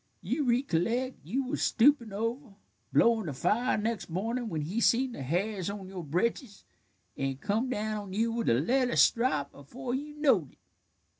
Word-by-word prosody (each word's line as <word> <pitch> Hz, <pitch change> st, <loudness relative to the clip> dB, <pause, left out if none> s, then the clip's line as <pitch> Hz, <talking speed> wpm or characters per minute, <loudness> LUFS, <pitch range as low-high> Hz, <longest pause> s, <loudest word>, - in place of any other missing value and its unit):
You 265 Hz, -, -1 dB
ricolleck 245 Hz, +1 st, +1 dB
you 270 Hz, +2 st, -1 dB
was 260 Hz, -, -3 dB
stoopin' 240 Hz, -2 st, +3 dB
over, 230 Hz, +2 st, -4 dB, 0.4 s
blowin' 225 Hz, -5 st, +3 dB
the 150 Hz, -, -3 dB
fire, 220 Hz, -, +1 dB
next 220 Hz, -1 st, -2 dB
mornin', 225 Hz, +7 st, -2 dB
when 160 Hz, -5 st, -2 dB
he 185 Hz, +10 st, -2 dB
seen 255 Hz, +3 st, +3 dB
the 190 Hz, -, -7 dB
hairs 185 Hz, +7 st, -1 dB
on 200 Hz, -2 st, -6 dB
your 185 Hz, -2 st, -6 dB
britches, 200 Hz, -, -2 dB, 0.5 s
an' 135 Hz, -1 st, -2 dB
come 215 Hz, -, -1 dB
down 215 Hz, -3 st, -2 dB
on 195 Hz, -2 st, -9 dB
you 225 Hz, +3 st, +1 dB
with 230 Hz, 0 st, -2 dB
the -, -, +4 dB
leather 245 Hz, -, +1 dB
strop 230 Hz, -, +3 dB
afore 245 Hz, -, -7 dB
you 295 Hz, +3 st, -4 dB
knowed 245 Hz, -, +2 dB
it." -, -, -28 dB
225 Hz, 170 wpm, -29 LUFS, 185-250 Hz, 0.5 s, the